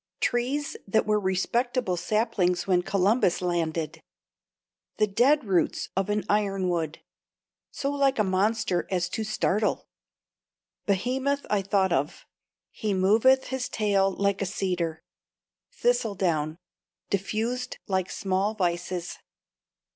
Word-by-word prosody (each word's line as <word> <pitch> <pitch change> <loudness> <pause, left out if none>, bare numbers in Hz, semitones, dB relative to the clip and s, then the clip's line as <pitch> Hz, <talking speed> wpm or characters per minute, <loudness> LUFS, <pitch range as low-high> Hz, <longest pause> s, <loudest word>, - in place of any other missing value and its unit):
Trees 265 +4 0
that 220 +3 +2
were 210 0 +2
respectable 215 +3 0
saplings 180 -2 0
when 180 -2 +3
Columbus 195 +1 +2
landed. 165 -3 -2 1.0
The 215 - +4
dead 250 +9 +3
roots 185 -7 0
of 195 +1 0
an 210 0 0
iron 195 -3 +1
wood 165 -3 -2 0.7
so 275 - -3
like 275 -1 +2
a 215 - +3
monster 195 -1 +1
as 180 -1 0
to 220 - -3
startle. 215 -1 0 1.0
Behemoth 260 +8 0
I 205 -2 +3
thought 190 -2 +1
of. 145 -1 -2 0.5
"He 210 -3 -2
moveth 225 +8 +4
his 260 -1 -3
tail 200 -3 +2
like 200 +1 0
a 195 - 0
cedar.' 175 -4 -2 0.7
Thistle 485 - +1
down. 160 -4 0 0.5
Diffused 225 +6 -2
like 190 -1 -1
small 195 +2 -1
vices. 175 -1 -2
200 Hz, 115 wpm, -27 LUFS, 180-225 Hz, 1.0 s, The